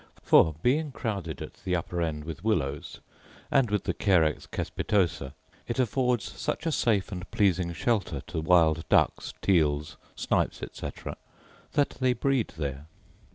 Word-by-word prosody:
For, 80 -2 +5
being 145 +4 +2
crowded 95 - -4
at - - -12
the 90 - 0
upper 85 0 -2
end 75 -2 -2
with 80 +3 -7
willows, 75 -10 -1 0.5
and 135 -4 +4
with 105 -1 0
the - - -1
carex 85 -7 +2
cespitosa,* 85 -9 -1 0.3
it 120 - -3
affords 125 -2 +1 0.2
such 160 - -2
a 165 - +1
safe 110 -9 +1
and 90 0 -6
pleasing 90 -4 +2
shelter 95 - 0
to 80 0 -3
wild 80 -2 +3
ducks, - - +2
teals, 75 -5 +2 0.2
snipes, - - 0
etc., - - -6 0.6
that 145 - +1
they 130 -1 +3
breed 135 -3 +1
there. 70 -1 -4
90 Hz, 145 wpm, -28 LUFS, 80-115 Hz, 0.6 s, For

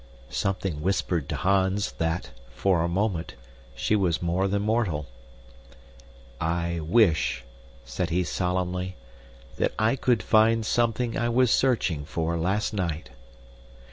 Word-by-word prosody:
Something 95 -5 -2
whispered 90 -4 0
to - - -1
Hans 95 +2 +1
that, 80 +1 -1 0.2
for 95 -4 +2
a 85 - +1
moment, 90 - -1 0.4
she 110 - +1
was 90 -6 +1
more 90 +3 0
than 100 +1 0
mortal. 105 -9 0 1.3
"I 85 +1 -1
wish," 85 0 +2 0.4
said - - -3
he 90 +2 +1
solemnly, 90 +1 -2 0.6
"that - - 0
I 110 +4 +2
could 125 -3 +1
find 110 +1 +4
something 120 +1 0
I 120 +1 0
was 125 0 +3
searching 105 - +2
for 80 +3 -2
last 95 +7 0
night!" 85 - -3
95 Hz, 125 wpm, -26 LUFS, 85-110 Hz, 1.3 s, find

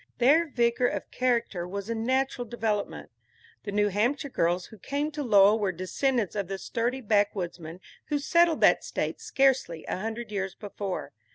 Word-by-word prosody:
Their 300 +7 +4
vigor 240 -1 +2
of - - -4
character 235 -8 0
was 200 +2 -5
a 230 - -1
natural 255 +2 0
development. 220 -3 -3 0.5
The 205 - -3
New 205 0 +2
Hampshire 240 +8 0
girls 175 -5 0
who 220 - -14
came 285 - -2
to 300 -1 -4
Lowell 210 -3 +5
were 200 -3 0
descendants 205 - -1
of 200 -3 -2
the 195 0 -4
sturdy 240 +6 -2
backwoodsmen 185 -6 -1 0.3
who 295 - -1
settled 335 +3 +3
that - - +5
State - - -3
scarcely 265 -12 +1
a - - -3
hundred 225 +3 -5
years 195 -2 -3
before. 200 -2 -5
220 Hz, 165 wpm, -27 LUFS, 195-260 Hz, 0.5 s, Lowell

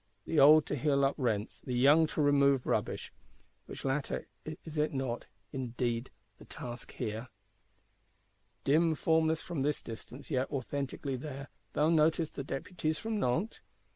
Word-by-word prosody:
The 160 - +1
old 150 +2 +8
to - - -2
heal 140 0 +2
up 135 - +2
rents; 110 -5 -1
the 125 - -4
young 145 +6 +6
to 155 - -1
remove 140 -2 +4
rubbish:—which - - -5
latter, 135 +1 -1 0.4
is 155 -2 -4
it 150 -1 +1
not, 130 -3 -2 0.3
indeed, 120 -1 -2 0.3
the - - -13
task 120 -1 -8
here? 110 +3 -4 1.4
Dim, 160 +3 +3
formless 160 +1 +2
from 170 -6 -3
this 145 +1 0
distance, 125 +6 -9
yet 130 -1 0
authentically 135 0 -3
there, 140 0 -7 0.2
thou 150 +2 +3
noticest 160 0 +3
the 140 - -3
Deputies 155 +3 -3
from 220 -1 -2
Nantes? 165 - 0
140 Hz, 140 wpm, -32 LUFS, 130-155 Hz, 1.4 s, old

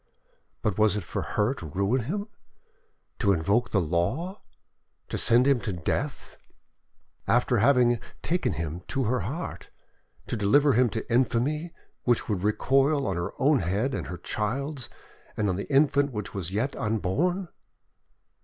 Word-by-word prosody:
but 105 -2 0
was 105 -1 +4
it 105 - -3
for - - -4
her 105 +6 0
to 85 - -8
ruin 100 - 0
him, 200 - -3 0.9
to 100 - +3
invoke 100 +7 +1
the 100 - +2
law, 95 - -1 0.7
to - - -4
send 120 +2 +4
him 140 -2 +4
to 105 - -2
death, 85 -4 -3 0.9
after 125 0 +3
having 120 -1 +4 0.2
taken 175 +2 0
him 85 +1 -4
to 135 -2 -1
her 125 +3 +1
heart, 165 +7 -5 0.6
to - - -3
deliver 140 +7 +4
him 125 +1 +4
to 110 +2 -4
infamy 130 +7 +1 0.3
which 120 -2 +1
would 100 -5 -1
recoil 135 +7 +2
on 95 - -1
her 85 0 -2
own 145 0 +3
head 100 +9 0
and - - -3
her 90 - -5
child's 130 - -2 0.5
and 105 - +1
on 90 - 0
the 100 +9 -5
infant 140 0 +3
which 105 -4 -5
was 95 -3 -3
yet 115 +8 -1
unborn? 135 - 0
120 Hz, 155 wpm, -27 LUFS, 100-140 Hz, 0.9 s, was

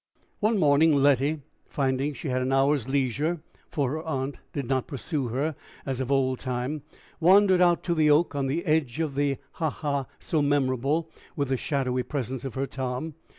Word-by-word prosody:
One 215 +1 +2
morning, 150 -1 +5
Letty, 140 +2 +3 0.3
finding 135 +1 -1
she 145 - -5
had 130 0 0
an 130 +1 -1
hour's 135 -1 +2
leisure, 140 +5 0 0.3
for 140 -4 -1
her 155 +2 -3
aunt 140 -4 -3
did 140 -3 -3
not 130 -1 0
pursue 140 -1 -3
her 140 +6 -1 0.3
as 135 -2 -2
of 130 +1 -3
old 130 -2 +2
time, 130 +3 -3 0.4
wandered 185 +2 +5
out 175 -1 +4
to 175 - 0
the 155 -2 +3
oak 155 +4 +4
on 140 -1 -1
the 160 +6 -2
edge 155 -4 +1
of 155 -4 -1
the 140 -1 0
ha 160 -3 -1
ha, 140 -3 -2
so 155 - -1
memorable 145 +3 +1 0.2
with 140 -4 -1
the 135 - +2
shadowy 130 -2 -1
presence 130 -2 -4
of 135 - -5
her 135 +1 0
Tom. 130 +3 -4
140 Hz, 185 wpm, -26 LUFS, 130-155 Hz, 0.4 s, morning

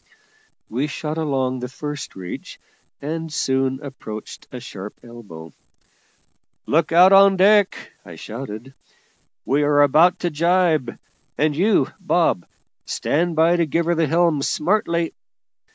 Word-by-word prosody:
We 130 +6 -2
shot 155 +1 -4
along 130 -4 -1
the 125 - -5
first 150 +1 -7
reach, 90 -2 -8 0.4
and 160 +2 -4
soon 130 -2 0
approached 110 -6 -9
a 125 - -7
sharp 105 -4 -9
elbow. 100 -10 -12 1.1
"Look 160 +1 +1
out 180 +3 +6
on 195 0 +6
deck!" 200 +1 +3
I - - -11
shouted; 120 +2 -8 0.7
"we 140 +2 +1
are 145 0 +4
about 165 +6 +4
to 175 - -1
jibe; 165 -5 +1 0.4
and 150 0 +1
you, 195 +6 +2
Bob, 175 - 0 0.4
stand 170 +3 -1
by 165 +2 +3
to 170 -2 +1
give 165 +3 0
her 170 - +1
the 165 -2 +1
helm 165 -2 +2
smartly. 170 +1 0
150 Hz, 130 wpm, -21 LUFS, 130-170 Hz, 1.1 s, out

